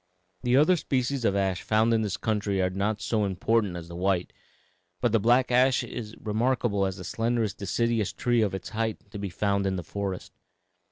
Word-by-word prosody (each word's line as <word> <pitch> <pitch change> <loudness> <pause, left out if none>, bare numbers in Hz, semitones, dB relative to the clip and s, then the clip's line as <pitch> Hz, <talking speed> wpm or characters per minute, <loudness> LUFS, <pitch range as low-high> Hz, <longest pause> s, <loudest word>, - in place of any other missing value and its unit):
"The 125 +1 +3
other 160 +5 +5
species 130 -3 -1
of 100 - +2
ash 95 -2 0
found 110 +2 +2
in 110 - +2
this 105 -3 -2
country 105 -3 -1
are 90 0 +1
not 100 +3 -1
so 110 -2 +1
important 100 +1 0
as 85 -1 -7
the 85 - -9
white, 90 0 0 0.7
but 120 - +1
the 115 - +3
black 120 +4 +3
ash 130 +1 +4
is 115 -2 -7
remarkable 110 -2 0
as 95 -1 -5
the 90 - -8
slenderest 115 +1 -1
deciduous 110 +2 0
tree 120 -1 +1
of 100 -3 0
its 95 - -6
height 110 -2 -3
to 105 - -6
be 100 -1 -3
found 100 +2 0
in 95 - 0
the 90 - -4
forest. 95 +2 -5
105 Hz, 200 wpm, -27 LUFS, 95-120 Hz, 0.7 s, other